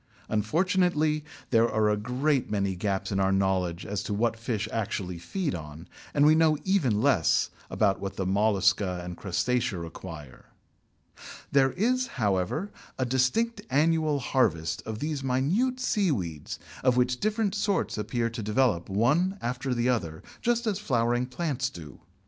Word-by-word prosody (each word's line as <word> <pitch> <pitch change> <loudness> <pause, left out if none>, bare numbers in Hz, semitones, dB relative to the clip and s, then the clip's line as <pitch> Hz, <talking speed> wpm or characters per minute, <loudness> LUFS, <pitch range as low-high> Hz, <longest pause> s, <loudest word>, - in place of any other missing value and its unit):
Unfortunately 155 - +1 0.3
there 115 -1 +4
are 110 0 +2
a 105 - +3
great 125 +6 0
many 100 -2 0
gaps 95 +2 -2
in 95 - 0
our 95 0 +2
knowledge 95 -3 0
as 100 -1 -3
to 105 - -3
what 115 +2 +1
fish 115 -2 -3
actually 100 -5 -3
feed 170 - -2
on, 80 0 -8 0.2
and 145 0 +3
we 155 - +7
know 160 -1 +4
even 135 - +2
less 125 - +3 0.2
about 100 -2 +1
what 100 0 -5
the 95 - -2
Mollusca 100 -2 +2
and 90 0 -6
Crustacea 100 +4 -1
require. 80 -4 -9 1.1
There 135 -1 +4
is, 255 +6 +1
however, 105 - 0 0.3
a 130 - 0
distinct 130 - +1
annual 155 +2 +2
harvest 105 - 0
of 110 -1 -4
these 150 +1 -3
minute 170 - +1
seaweeds, 130 - -1 0.3
of 130 -1 +3
which 125 0 +2
different 215 -2 0
sorts 205 -1 0
appear 115 +2 -1
to 115 0 -5
develop 105 -5 +1
one 150 - +2
after 125 +3 -3
the 120 0 +1
other, 85 -10 -2 0.2
just 235 0 +1
as 205 -3 0
flowering 120 - +1
plants 135 -2 -2
do. 80 - -11
120 Hz, 150 wpm, -27 LUFS, 100-155 Hz, 1.1 s, we